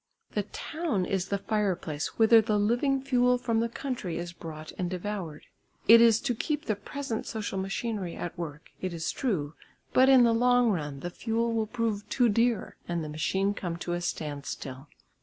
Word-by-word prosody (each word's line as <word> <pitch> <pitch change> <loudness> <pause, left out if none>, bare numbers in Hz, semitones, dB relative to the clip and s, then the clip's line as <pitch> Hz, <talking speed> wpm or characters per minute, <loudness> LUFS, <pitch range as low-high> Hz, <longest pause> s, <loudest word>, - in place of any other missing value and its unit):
The 210 - 0
town 235 - -2
is 190 -1 -1
the 200 - 0
fire 210 -2 0
place 155 -3 -5
whither 225 0 +7
the 215 -1 +1
living 245 +6 +1
fuel 250 -2 +3
from 230 -2 0
the 230 +1 0
country 235 -8 -4
is 170 0 -5
brought 155 -2 -8
and 180 -1 -1
devoured; 185 -4 -5 0.4
it 230 +1 +9
is 230 -1 +6
to 265 -3 0
keep 300 +6 -2
the 215 - 0
present 230 +3 -5
social 210 -3 -3
machinery 195 -1 -3
at 175 - -5
work, 160 -3 -7
it 185 -2 -3
is 160 - -2
true, 160 - -1 0.4
but 260 +1 +6
in 260 -2 +8
the 230 -1 +4
long 245 0 +4
run 145 -6 -3
the 175 - -4
fuel 230 +3 -1
will 220 -1 0
prove 225 -3 -2
too 245 -3 +3
dear, 230 0 +1
and 170 -2 -2
the 155 - -5
machine 190 +6 0
come 175 -4 -4
to 175 0 -3
a 175 - -2
standstill. 145 -4 -5
205 Hz, 190 wpm, -28 LUFS, 175-235 Hz, 0.4 s, it